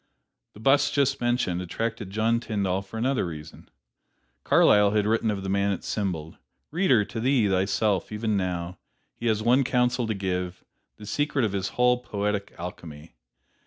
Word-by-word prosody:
The - - -12
bust 140 +5 +3
just 140 -2 +1
mentioned, 120 -7 0
attracted 115 +3 -4
John 110 +3 +1
Tyndall 100 -5 -1
for 100 +3 -9
another 130 +2 +1
reason: 80 -3 -8 0.7
Carlyle 105 -1 +5
had 105 -1 +2
written 110 +1 +1
of 100 -2 -2
the - - -4
man 100 +1 +1
it 95 - -4
symboled: 85 -7 -3 0.3
"Reader, 145 - +3
to 115 - -6
thee, 125 -2 +2
thyself, 95 +1 0
even 105 0 -1
now, 90 -2 -3 0.3
he 120 - -4
has 110 -1 +1
one 125 +4 +4
counsel 125 -1 +1
to 110 - -1
give, 90 -2 -3 0.3
the 105 - -11
secret 140 +3 0
of 105 - -1
his 100 -1 -2
whole 125 0 +4
poetic 105 -3 -3
alchemy. 80 -3 -9
105 Hz, 160 wpm, -26 LUFS, 95-120 Hz, 0.7 s, Carlyle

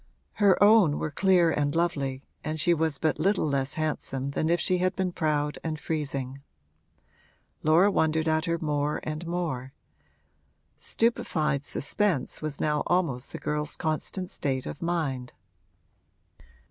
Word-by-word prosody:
Her 200 -2 +6
own 205 -8 +6
were 155 - -3
clear 180 0 +4
and 145 0 0
lovely 140 -6 -1 0.2
and 155 +1 -3
she 170 +3 +4
was 160 -3 0
but 155 +1 0
little 195 -1 +2
less 140 -1 -1
handsome 140 -4 -2
than 155 +3 -1
if 170 +1 +3
she 180 +2 +1
had 185 +1 +1
been 185 -1 -1
proud 150 -3 -1
and 155 -2 -3
freezing. 140 -4 -3 1.2
Laura 170 +6 +5
wondered 160 -2 +1
at 160 +1 +1
her 170 -1 0
more 150 -2 -1
and 155 +2 -5
more; 155 -7 -3 1.1
stupefied 155 - 0
suspense 170 +2 -1
was 155 -2 -4
now 150 -1 +1
almost 160 -9 0
the - - -5
girl's 150 0 -2
constant 175 +3 -3
state 130 -2 -2
of - - -7
mind. 150 -8 -2
155 Hz, 140 wpm, -27 LUFS, 145-175 Hz, 1.2 s, Her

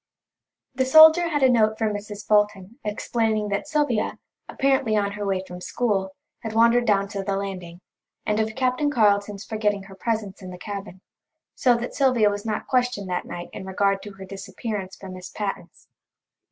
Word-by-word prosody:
The 260 0 0
soldier 315 +5 +8
had 290 -4 0
a - - +8
note 220 -2 +3
for 220 - 0
Mrs. 205 0 -5
Fulton 210 +2 +1
explaining 215 0 -1
that 200 +8 -2
Sylvia, 295 -8 0 0.3
apparently 265 -5 +1
on 200 -1 0
her 205 0 -5
way 190 -1 0
from 180 -1 -9
school, 195 -4 -1 0.2
had 225 -1 -6
wandered 235 +1 +4
down 200 -2 +3
to 200 -1 -4
the 195 0 -1
landing, 185 -3 -6 0.4
and 210 0 0
of 220 0 -1
Captain 260 +3 +1
Carleton's 205 -5 +1
forgetting 210 -2 -1
her 195 0 -13
presence 215 -2 -3
in 185 - -8
the 180 - -8
cabin, 195 -1 -7 0.5
so 245 -2 +3
that 235 +1 -5
Sylvia 250 -7 +3
was 205 +2 -5
not 215 - -2
questioned 245 -7 0
that 180 - -2
night 175 0 -7
in - - -7
regard 195 +1 0
to 205 - -9
her 195 -1 -10
disappearance 195 0 -6
from 190 -1 -10
Miss 185 0 -9
Patten's. 205 -2 -6
210 Hz, 180 wpm, -24 LUFS, 195-235 Hz, 0.5 s, soldier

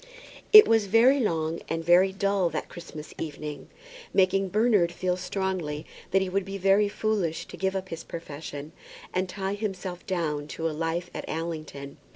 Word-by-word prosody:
It 430 -1 +11
was 225 -3 +3
very 240 +7 +5
long 165 -7 0
and 165 0 -2
very 180 +3 +5
dull 195 -2 +1
that 155 - -4
Christmas 155 -3 -9
evening, 150 -2 -6 0.5
making 195 0 +3
Bernard 210 -4 +3
feel 180 +1 -1
strongly 180 -5 -3 0.2
that 190 +1 +3
he - - -3
would 195 +1 0
be 195 +1 -6
very 195 +2 +3
foolish 205 -6 -1
to - - -10
give 190 0 -1
up 190 0 -3
his 165 - -6
profession, 150 -2 -7 0.4
and 185 0 0
tie 195 +1 -3
himself 190 -4 -4
down 155 -6 -1
to 165 - -1
a - - -1
life 165 +3 -2
at - - -5
Allington. 155 -4 -5
180 Hz, 170 wpm, -27 LUFS, 160-195 Hz, 0.5 s, It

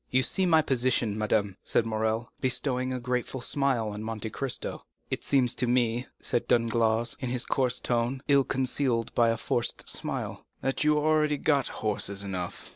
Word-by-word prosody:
"You 130 0 +3
see 185 +8 +1
my 160 -2 +5
position, 125 -5 +1
madame," 105 -2 0
said 115 - +2
Morrel, 110 +1 -1
bestowing 130 0 0
a 130 - -2
grateful 125 +1 -2
smile 125 -3 +1
on 105 0 -6
Monte 110 0 -4
Cristo. 135 +2 -3 0.3
"It - - -2
seems 130 -4 +2
to 125 - -1
me," 120 0 +1
said 120 - -1
Danglars, 115 0 +2
in 130 -4 -3
his 125 0 -2
coarse 125 -2 +1
tone, 120 +3 -1
ill 140 -1 +5
concealed 130 -3 0
by 115 -1 +4
a 115 - +1
forced 120 +1 -2
smile, - - -3 0.2
"that 135 +2 0
you 150 0 +4
have 150 - +1
already 155 -1 +3
got 140 -2 +2
horses 100 -2 -2
enough." 90 -3 -5
120 Hz, 175 wpm, -28 LUFS, 115-135 Hz, 0.3 s, my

